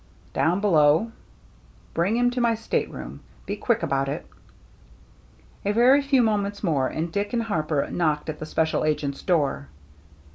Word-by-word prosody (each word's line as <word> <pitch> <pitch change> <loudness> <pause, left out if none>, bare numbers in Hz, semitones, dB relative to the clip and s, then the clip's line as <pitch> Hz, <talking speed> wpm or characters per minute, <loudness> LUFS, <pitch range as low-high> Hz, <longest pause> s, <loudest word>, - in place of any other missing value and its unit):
" - - -29
Down 170 +6 +2
below." 165 +2 +4 0.4
" - - -29
Bring 190 +7 +1
him 245 0 +3
to 250 0 -2
my 235 -1 +3
stateroom. 225 +1 -4 0.3
Be 205 - -3
quick 220 -1 0
about 135 -3 0
it.'* 150 +4 -4 1.4
A 200 - +1
very 250 +5 +5
few 275 -3 +3
moments 205 -2 -1
more, 145 -8 +1
and 160 +4 -3
Dick 205 +5 -2
and 235 -1 +1
Harper 155 -9 -1
knocked 155 -4 0
at 155 -1 -5
the 155 - -6
special 160 0 0
agent's 150 -2 -1
door. 145 - 0
170 Hz, 160 wpm, -24 LUFS, 150-225 Hz, 1.4 s, very